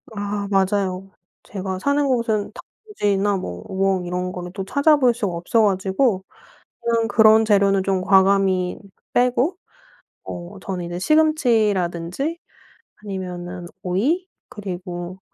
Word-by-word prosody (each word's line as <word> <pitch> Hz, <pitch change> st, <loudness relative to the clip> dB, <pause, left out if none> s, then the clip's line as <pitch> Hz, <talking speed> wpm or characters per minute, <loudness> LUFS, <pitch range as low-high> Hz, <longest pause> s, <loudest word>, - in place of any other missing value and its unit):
아. 205 Hz, 0 st, -3 dB
맞아요. 195 Hz, -1 st, 0 dB, 0.3 s
제가 190 Hz, -2 st, -5 dB
사는 280 Hz, +5 st, +1 dB
곳은 230 Hz, -5 st, 0 dB
단무지나 205 Hz, -, -2 dB
뭐 90 Hz, -, -6 dB
우엉 190 Hz, -1 st, 0 dB
이런 180 Hz, +1 st, -3 dB
거를 180 Hz, -1 st, -7 dB
또 195 Hz, 0 st, -4 dB
찾아볼 280 Hz, 0 st, +4 dB
수가 210 Hz, -6 st, -2 dB
없어 175 Hz, +7 st, +1 dB
가지고 195 Hz, +1 st, +1 dB, 0.6 s
그럼 230 Hz, -1 st, 0 dB
그런 220 Hz, -1 st, +6 dB
재료는 200 Hz, -2 st, +3 dB
좀 190 Hz, -1 st, +1 dB
과감히 190 Hz, -1 st, +3 dB, 0.3 s
빼고 250 Hz, +8 st, +2 dB, 0.7 s
어 175 Hz, +3 st, -8 dB
저는 180 Hz, -1 st, -4 dB
이제 175 Hz, 0 st, -5 dB
시금치라든지 225 Hz, -, +1 dB, 0.7 s
아니면은 180 Hz, -3 st, -6 dB
오이 265 Hz, -, 0 dB, 0.2 s
그리고 180 Hz, -2 st, -6 dB
195 Hz, 255 characters per minute, -22 LUFS, 185-230 Hz, 0.7 s, 그런